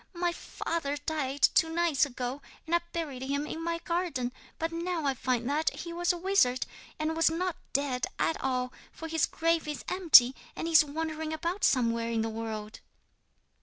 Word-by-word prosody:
"My 345 0 +1
father 325 -4 -3
died 290 -2 -3
two 320 - +4
nights 325 -3 +2
ago, 255 +1 -4 0.2
and 325 - -4
I 345 - +5
buried 300 -7 -4
him 280 +2 -1
in 320 +2 -5
my 335 0 -1
garden. 335 -8 -2 0.3
But 325 +1 -2
now 335 -1 -2
I 275 - +2
find 250 -2 -1
that 305 +3 +2
he 340 0 -6
was 350 +1 +1
a 350 - -3
wizard, 345 -9 +2 0.3
and 315 +1 -1
was 330 0 +4
not 350 +1 -1 0.2
dead 265 -3 0
at 325 - 0
all, 255 -1 -1 0.2
for 325 - -7
his 320 -1 +1
grave 330 -1 0
is 300 - -5
empty 310 -9 +7 0.2
and - - -4
he 330 - -2
is 315 - +9
wandering 315 +1 -4
about 340 +5 -3
somewhere 230 -2 +2
in 230 -1 0
the 225 - -1
world." 220 -1 -5
310 Hz, 185 wpm, -29 LUFS, 260-335 Hz, 0.3 s, is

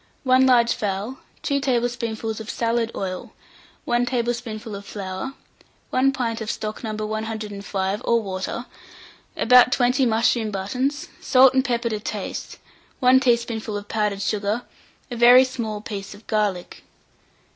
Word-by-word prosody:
1 260 0 +5
large 240 -2 +5
fowl, 205 +5 -3 0.2
4 280 0 +1
tablespoonfuls 235 -4 -1
of 220 0 -8
salad 230 0 0
oil, 185 -2 -5 0.5
1 240 0 +1
tablespoonful 235 -3 -3
of 200 - -8
flour, 200 +6 -6 0.6
1 265 +1 +3
pint 235 -4 -2
of 215 - -4
stock 215 +1 -4
No. 220 -1 -3
105, 210 -2 -3
or 235 0 +3
water, 195 +3 -4 0.7
about 250 +1 +6
20 250 +1 +3
mushroom 225 0 +2
buttons, 250 +9 -2
salt 260 -1 +5
and 260 0 +3
pepper 235 -2 -1
to 215 -2 -2
taste, 210 -1 -5 0.4
1 255 +1 +6
teaspoonful 235 -4 0
of 205 0 -8
powdered 210 -2 -1
sugar, 210 +2 -1 0.5
a - - -3
very 245 +2 +8
small 230 -5 -4
piece 200 -2 -6
of 205 - -17
garlic. 205 -5 -1
230 Hz, 135 wpm, -23 LUFS, 210-245 Hz, 0.7 s, very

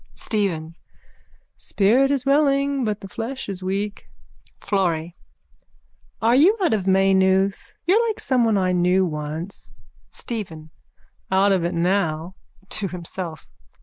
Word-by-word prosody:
STEPHEN: 170 -7 -2 0.8
Spirit 235 +7 +2
is 275 -2 0
willing 275 -1 +2
but 210 -2 -2
the 195 - -8
flesh 230 +7 -5
is 195 -2 -5
weak. 200 +2 -3 0.5
FLORRY: 175 -4 -1 1.0
Are 225 +1 +3
you 355 - +5
out 345 - +2
of 195 -3 -1
Maynooth? 190 0 +2
You're 435 +7 +3
like 440 - -3
someone 235 -5 +2
I 185 -1 +1
knew 180 +1 +3
once. 155 +3 -5 0.4
STEPHEN: 165 -9 -6 0.6
Out 195 +1 +4
of 185 -3 +2
it 175 +1 -1
now. 170 -1 0 0.3
_(To 195 0 -3
himself.) 175 -1 -6
195 Hz, 120 wpm, -22 LUFS, 180-235 Hz, 1.0 s, you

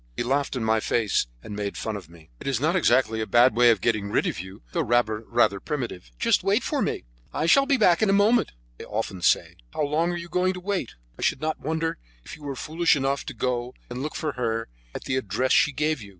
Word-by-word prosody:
He - - 0
laughed 140 +3 0
in 125 - -2
my 110 0 +2
face, 110 - +1 0.2
and 105 - -7
made 100 -1 -4
fun 110 - -3
of 95 -6 -8
me. 80 -5 -17
"It - - -8
is 135 -4 0
not 160 +6 +1
exactly 125 -8 +2
a 110 - -3
bad 120 0 +5
way 120 0 +6
of 115 - +3
getting 105 -3 0
rid - - +1
of - - -2
you, 95 +4 -9
though 170 - 0
rather 115 -4 +1
primitive. 120 - -5
'Just - - +2
wait - - +2
for - - -1
me, - - -2 0.3
I 155 - -1
shall 275 +11 +5
be 280 -2 +3
back 175 -6 +4
in 215 - +3
a - - +5
moment,' 210 +4 +3 0.3
they - - -8
often 105 -3 -4
say. 85 - +2 0.2
How 155 - 0
long 155 +4 +1
are 175 - -3
you 170 0 -7
going 180 +1 +1
to 180 - -7
wait? 185 - -3 0.2
I - - -7
should - - +1
not 155 0 -2
wonder 160 +2 -2 0.3
if - - -8
you - - -18
were 140 -2 -5
foolish 165 +5 +1
enough 135 0 -1
to - - -6
go 125 0 -2 0.2
and 125 +1 -4
look 150 +2 -4
for 155 - -2
her 115 -3 -2 0.3
at - - -5
the 130 - -1
address 125 +2 -1
she 150 - +5
gave 150 -1 -1
you. 105 - -10
130 Hz, 250 wpm, -25 LUFS, 110-160 Hz, 0.3 s, way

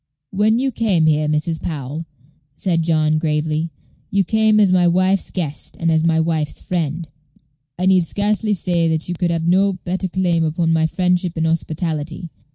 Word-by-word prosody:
"When 210 +3 +2
you 265 +2 0
came 205 -9 +1
here, 155 -1 +2
Mrs. 155 +2 -1
Powell," 150 +1 -5 0.5
said 170 -4 0
John, 155 -1 +1
gravely, 155 +1 -1 0.4
"you 200 -1 +2
came 220 +2 +3
as 200 -3 +4
my 180 -1 +4
wife's 185 +2 +2
guest 155 -6 -4
and 165 -1 +1
as 160 0 +2
my 165 -1 +2
wife's 160 -2 -1
friend. 165 -2 -3 0.7
I 180 - -1
need 190 -2 +4
scarcely 205 +4 0
say 170 -2 0
that 160 -1 -1
you 175 - -2
could 175 0 -1
have 165 -1 -1
had - - -2
no 195 +3 +3
better 185 +2 -2
claim 175 -2 0
upon 165 +1 0
my 160 0 +2
friendship 180 0 0
and 160 - 0
hospitality. 160 0 -3
170 Hz, 175 wpm, -19 LUFS, 160-185 Hz, 0.7 s, as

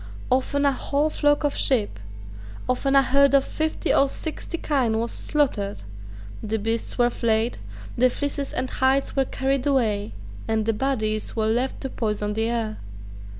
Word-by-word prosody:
Often 275 +2 +1
a 280 - +5
whole 285 +3 0
flock 290 0 +2
of 290 - 0
sheep, 215 - +1 0.7
often 270 +2 +1
a 275 - +7
herd 280 +1 +4
of 275 - +4
fifty 315 0 -1
or 275 - +4
sixty 320 +3 -5
kine, 255 -9 0
was 230 +1 -1
slaughtered: 215 - -1 0.6
the 220 +1 -1
beasts 225 +2 -2
were 240 -1 +3
flayed; 225 0 0 0.4
the 255 +2 +4
fleeces 285 +1 -3
and 255 0 -2
hides 265 +1 +1
were 270 -1 +2
carried 270 +1 -1
away; 215 - +1 0.3
and 220 -1 0
the 225 - +1
bodies 215 -3 -1
were 220 -1 0
left 240 +4 0
to 265 - -4
poison 210 -2 -2
the 225 +2 0
air. 225 -2 -2
255 Hz, 160 wpm, -24 LUFS, 220-275 Hz, 0.7 s, a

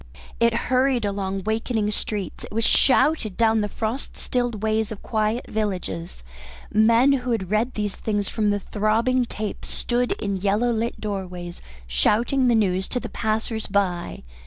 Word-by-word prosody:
It 235 0 +3 0.2
hurried 255 -3 +3
along 195 -1 -2
awakening 220 +1 -1
streets, 205 -3 -4
it - - -9
was 225 +2 0
shouted 255 -4 +3
down 225 -1 +3
the 210 - -1
frost 225 +6 -4
stilled 245 -4 -2
ways 220 0 +1
of 210 - -7
quiet 220 +1 0
villages, 185 - -3 0.5
men 230 +5 +5
who 250 -2 -1
had 200 -6 -1
read 225 +4 +1
these 210 -2 -2
things 205 -2 -1
from 215 -2 0
the 205 0 +1
throbbing 225 +5 +1
tape 215 -2 -5
stood 245 0 -1
in 200 -2 -3
yellow 205 +5 +1
lit 230 +1 -2
doorways 180 -4 -5 0.2
shouting 235 - +2
the 240 - +4
news 190 -3 +1
to 250 - -2
the - - -6
passers 220 0 -2
by. 190 -4 -1
215 Hz, 160 wpm, -24 LUFS, 200-235 Hz, 0.5 s, men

